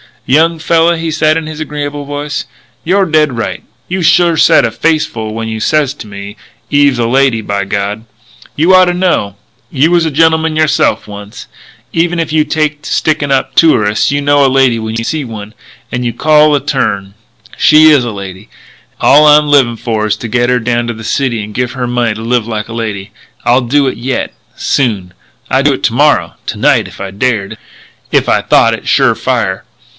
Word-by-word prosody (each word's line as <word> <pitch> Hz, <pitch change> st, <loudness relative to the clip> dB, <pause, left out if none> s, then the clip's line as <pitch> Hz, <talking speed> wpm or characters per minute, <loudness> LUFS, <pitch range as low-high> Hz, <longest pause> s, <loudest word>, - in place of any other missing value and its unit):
"Young 160 Hz, +5 st, +2 dB
fella," 165 Hz, +1 st, +2 dB
he 165 Hz, 0 st, -3 dB
said 155 Hz, 0 st, +1 dB
in 165 Hz, -, -4 dB
his 155 Hz, -1 st, -8 dB
agreeable 145 Hz, -1 st, -5 dB
voice, 145 Hz, +1 st, -4 dB, 0.4 s
"you're 190 Hz, +3 st, +2 dB
dead 155 Hz, -6 st, +1 dB
right. 115 Hz, -, -4 dB, 0.3 s
You 185 Hz, +1 st, -2 dB
sure 170 Hz, 0 st, +3 dB
said -, -, +4 dB
a 115 Hz, -, -2 dB
face 155 Hz, +6 st, 0 dB
full 110 Hz, -1 st, -6 dB
when 115 Hz, 0 st, -4 dB
you 110 Hz, 0 st, -4 dB
says 145 Hz, +2 st, 0 dB
to 110 Hz, -, -10 dB
me, 100 Hz, +1 st, -9 dB, 0.3 s
'Eve's 145 Hz, -3 st, +3 dB
a 120 Hz, -, 0 dB
lady, 130 Hz, -2 st, +1 dB
by 100 Hz, -1 st, -3 dB
God!' 100 Hz, +3 st, -3 dB, 0.5 s
You 165 Hz, +5 st, +3 dB
oughta 185 Hz, -1 st, +5 dB
know. 175 Hz, -, -1 dB, 0.3 s
You 155 Hz, +1 st, +1 dB
was 170 Hz, -1 st, +2 dB
a -, -, 0 dB
gentleman 160 Hz, +1 st, +1 dB
yourself 155 Hz, 0 st, +1 dB
once. 105 Hz, 0 st, -10 dB, 0.4 s
Even 175 Hz, +1 st, 0 dB
if 165 Hz, -2 st, -2 dB
you 155 Hz, -1 st, +2 dB
take 150 Hz, -1 st, -1 dB
to -, -, -8 dB
stickin' 150 Hz, -2 st, 0 dB
up 135 Hz, -, 0 dB
tourists 105 Hz, -10 st, +3 dB
you 145 Hz, 0 st, -1 dB
know 145 Hz, 0 st, +3 dB
a -, -, +4 dB
lady 130 Hz, -3 st, +2 dB
when 110 Hz, 0 st, -5 dB
you 115 Hz, -, -3 dB
see 150 Hz, +3 st, -3 dB
one. 110 Hz, -2 st, -9 dB, 0.4 s
And 125 Hz, 0 st, -3 dB
you 120 Hz, -, -2 dB
called 150 Hz, +3 st, +3 dB
the 140 Hz, -, -3 dB
turn. 100 Hz, -8 st, -2 dB, 0.4 s
She 155 Hz, +1 st, +6 dB
is 140 Hz, -5 st, +3 dB
a 120 Hz, -, -3 dB
lady. 95 Hz, -1 st, -9 dB, 0.5 s
All 150 Hz, +2 st, +5 dB
I'm 150 Hz, 0 st, +5 dB
livin' 135 Hz, -5 st, +3 dB
for 110 Hz, -2 st, -2 dB
is 105 Hz, -, 0 dB
to 120 Hz, -, -6 dB
get 120 Hz, +1 st, 0 dB
her 125 Hz, 0 st, +2 dB
down 120 Hz, 0 st, -1 dB
to 120 Hz, -, -3 dB
the 110 Hz, 0 st, -10 dB
city 120 Hz, -1 st, -1 dB
and 105 Hz, +1 st, -9 dB
give 125 Hz, +2 st, -2 dB
her 125 Hz, -2 st, -3 dB
money 120 Hz, -2 st, -1 dB
to 110 Hz, -, -8 dB
live 115 Hz, -1 st, -1 dB
like 110 Hz, -1 st, -4 dB
a -, -, -7 dB
lady. 105 Hz, -4 st, -5 dB, 0.3 s
I'll 125 Hz, +2 st, +3 dB
do 140 Hz, +4 st, +1 dB
it 130 Hz, -, -3 dB
yet.... 125 Hz, +3 st, -3 dB, 0.2 s
Soon!... 105 Hz, -10 st, -1 dB, 0.4 s
I'd -, -, +1 dB
do -, -, +4 dB
it -, -, -6 dB
to -, -, +1 dB
morrow -, -, +2 dB
to -, -, -4 dB
night -, -, +2 dB
if -, -, -12 dB
I 100 Hz, -1 st, -5 dB
dared.... 105 Hz, -1 st, -2 dB, 0.5 s
If -, -, +1 dB
I -, -, +2 dB
thought -, -, +3 dB
it -, -, -7 dB
sure -, -, +3 dB
fire.... 95 Hz, 0 st, -2 dB
130 Hz, 205 wpm, -12 LUFS, 110-155 Hz, 0.5 s, She